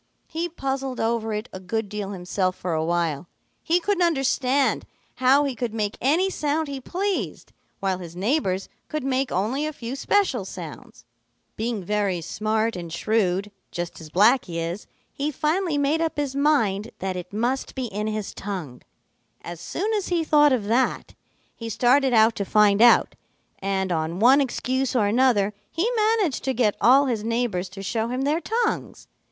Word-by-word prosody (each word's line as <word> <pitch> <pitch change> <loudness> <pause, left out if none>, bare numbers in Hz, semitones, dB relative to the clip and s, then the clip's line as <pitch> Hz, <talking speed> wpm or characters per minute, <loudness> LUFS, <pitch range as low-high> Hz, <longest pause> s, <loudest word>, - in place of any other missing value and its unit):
He 335 +2 -3
puzzled 270 -4 -3
over 225 -1 0
it 210 +2 -3
a 190 - -6
good 215 +4 -3
deal 205 -1 -5
himself 185 -1 -1
for 180 -2 -3
a 160 0 0
while. 170 -1 -1 0.3
He 340 +2 +2
couldn't 390 +1 0
understand 270 -4 +1 0.3
how 260 +3 +5
he 280 -2 -1
could 240 -2 -4
make 210 -1 -1
any 315 +9 +3
sound 310 -3 -1
he 275 -1 -5
pleased, 385 +7 -3 0.3
while 190 -2 0
his 170 -2 -9
neighbors 195 - 0 0.2
could 305 -2 -3
make 265 0 0
only 220 +10 0
a 310 - -1
few 250 -3 -6
special 275 - +1
sounds. 190 - -9 0.5
"Being 220 -3 -2
very 200 -2 0
smart 215 +5 -1
and 170 -2 -6
shrewd, 200 +1 0 0.2
just 175 -1 -5
as 155 - -10
Blacky 205 - +3
is, 170 +4 -4 0.3
he 285 +2 -2
finally 310 +3 0
made 290 +3 +1
up 325 -2 -1
his 285 -2 -2
mind 230 -8 +2
that 190 0 -3
it 180 0 -6
must 240 +6 -2
be 260 -2 -2
in 210 -1 -3
his 215 -2 -3
tongue. 180 -11 -6 0.6
As 170 -1 -7
soon 405 - -2
as 410 -3 -1
he 345 -2 +1
thought 295 -2 +5
of 250 -5 +1
that, 240 +5 0 0.4
he 230 -1 -6
started 255 +4 +3
out 225 -1 +5
to 200 - 0
find 210 0 +4
out, 240 0 +6 0.5
and 190 -1 -1
on 160 +1 -1
one 260 +6 +6
excuse 260 0 -1
or 225 -4 +3
another 210 -2 +3 0.2
he 340 +7 0
managed 430 - +1
to 265 - 0
get 220 -4 +2
all 270 +4 +6
his 230 -5 -1
neighbors 225 -5 -1
to 195 +1 -9
show 225 +3 -1
him 250 +2 -2
their 300 +4 +1
tongues. 455 +3 -2
230 Hz, 175 wpm, -24 LUFS, 195-280 Hz, 0.6 s, out